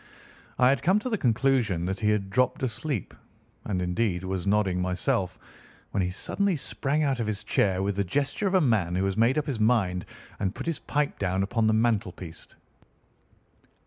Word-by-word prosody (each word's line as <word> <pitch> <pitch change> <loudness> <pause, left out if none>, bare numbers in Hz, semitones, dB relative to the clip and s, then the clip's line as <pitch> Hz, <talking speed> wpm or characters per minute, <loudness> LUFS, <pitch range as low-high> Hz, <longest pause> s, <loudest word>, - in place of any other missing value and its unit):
I 125 0 +5
had 135 -2 +2
come 185 +4 +3
to 225 +4 -2
the 220 - +1
conclusion 115 -7 +2
that 95 +1 -2
he 105 - +1
had 100 -2 0
dropped 125 +3 +1
asleep, 130 - -3 0.5
and 90 -3 -1
indeed 90 0 0
was 95 0 -3
nodding 100 -3 +2
myself, 90 0 -1 0.5
when 100 - 0
he 90 - 0
suddenly 195 - -1
sprang 145 +1 -1
out 135 -4 0
of 115 - -1
his 105 -2 -3
chair 95 -1 +1
with 100 0 -1
the 100 - +2
gesture 140 - -1
of 190 - +1
a 185 - +5
man 105 - +2
who 95 +1 +1
has 95 -1 0
made 115 +5 +3
up 150 - +1
his 135 -7 -3
mind 100 -6 +2 0.3
and 95 +1 -1
put - - -6
his 165 -2 -2
pipe 145 -1 -1
down 95 0 0
upon 110 +3 +1
the 110 - +3
mantelpiece. 100 -7 -1
105 Hz, 190 wpm, -27 LUFS, 95-135 Hz, 0.5 s, I